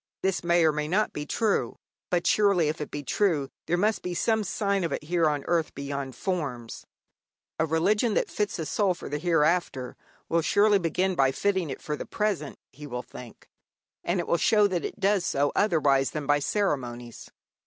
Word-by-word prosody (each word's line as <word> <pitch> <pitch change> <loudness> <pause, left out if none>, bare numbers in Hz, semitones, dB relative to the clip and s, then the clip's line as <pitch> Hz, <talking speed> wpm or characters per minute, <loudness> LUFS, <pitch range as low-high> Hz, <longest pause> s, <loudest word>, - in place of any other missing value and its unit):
This 190 -2 0
may 170 -1 +3
or 155 - +5
may 150 0 -2
not 200 +7 +1
be 150 0 -5
true; 220 +3 0 0.3
but 175 -1 0
surely, 200 -7 +3
if 155 +1 -4
it 150 - -4
be 145 - -6
true, 150 -2 +1 0.2
there 175 - +1
must 210 +4 +1
be 180 -1 -4
some 220 +3 +1
sign 200 0 -1
of 165 - -2
it - - -3
here 165 0 +2
on 145 -2 -2
earth 165 -2 0
beyond 140 -2 -5
forms. 135 - -4 0.7
A 160 - +2
religion 205 +8 +1
that - - +1
fits 205 -2 -2
a 160 - -3
soul 195 +2 +1
for - - -8
the 150 +1 -3
hereafter 165 -5 +1 0.3
will 165 0 +1
surely 205 +4 +4
begin 185 +2 0
by 135 -6 +3
fitting 190 +1 0
it 135 - -7
for 150 - -2
the - - -7
present, 200 -9 -2
he 145 +2 -10
will 125 -2 -5
think. 120 -2 -12 0.6
And 180 +2 0
it 175 - -2
will 170 - +1
show 210 +4 +4
that 185 -4 0
it - - -5
does 195 -1 +2
so 145 -4 +1
otherwise 145 -9 +3
than 150 -2 -5
by 145 +1 +3
ceremonies. 125 - -2
165 Hz, 195 wpm, -27 LUFS, 145-195 Hz, 0.7 s, or